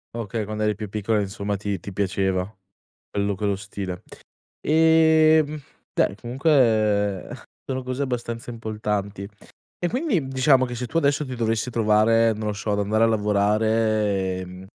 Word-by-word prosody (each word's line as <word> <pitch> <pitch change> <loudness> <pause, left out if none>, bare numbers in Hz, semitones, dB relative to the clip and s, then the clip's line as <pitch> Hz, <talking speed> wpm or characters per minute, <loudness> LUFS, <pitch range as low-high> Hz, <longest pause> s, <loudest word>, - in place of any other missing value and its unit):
Okay, 115 -1 -3
quando 110 +1 -5
eri 105 0 +1
più 105 -2 -6
piccola, 105 +1 0
insomma, 100 +1 -3
ti 100 -1 -3
ti 100 - -8
piaceva 95 -1 0 0.7
quello 100 0 -1
quello 100 0 -1
stile. 95 -2 -6 0.6
Ehm, 160 -1 +4 0.4
beh, - - +2
comunque 110 - +2 0.4
sono 130 -1 -3
cose 130 +2 -3
abbastanza 120 -2 -4
importanti. 105 -3 -3 0.5
E 175 - -1
quindi 220 - -1
diciamo 130 0 +3
che 120 - -6
se 125 - -4
tu 160 +6 -1
adesso 145 -1 +1
ti 130 -2 -6
dovessi 115 +1 -1
trovare, 115 0 +3
non 105 0 -4
lo - - 0
so, 105 +1 -3
ad 100 - 0
andare 110 +2 +2
a - - +5
lavorare, 105 -2 +1
ehm, 90 +1 -9
110 Hz, 150 wpm, -23 LUFS, 100-130 Hz, 0.7 s, a